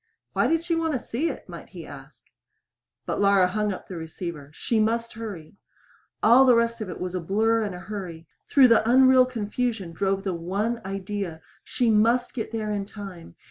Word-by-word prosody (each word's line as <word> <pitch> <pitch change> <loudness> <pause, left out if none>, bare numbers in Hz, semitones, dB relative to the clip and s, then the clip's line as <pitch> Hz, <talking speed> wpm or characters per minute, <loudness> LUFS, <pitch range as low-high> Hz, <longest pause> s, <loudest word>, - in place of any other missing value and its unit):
Why - - +2
did 330 0 +1
she 340 0 -1
want 325 -1 0
to 255 - 0
see 275 +9 -2
it - - -8
might - - -10
he - - -10
ask? - - -13 0.8
But - - -2
Laura 200 -2 +5
hung 210 +2 -1
up 185 - -7
the 185 - -7
receiver. 160 -2 -7
She 220 +8 -1
must 230 +2 0
hurry! 200 -7 -8 0.7
All 240 +4 +7
the 255 -2 +6
rest 230 0 +1
of 210 - -4
it - - -7
was 180 0 -4
a 185 - -1
blur 220 +6 +1
and 205 -4 -3
a - - -8
hurry. 185 -4 -7 0.2
Through 265 -3 +6
the 230 -1 +4
unreal 260 0 +6
confusion 225 -4 -3
drove 195 +3 -1
the 190 -3 -2
one 200 +8 -2
idea 195 -3 -4 0.2
she 240 -3 0
must 230 +3 +2
get 225 -3 -4
there 215 -2 -3
in 200 -1 -3
time! 195 - -10
210 Hz, 195 wpm, -25 LUFS, 185-235 Hz, 0.8 s, All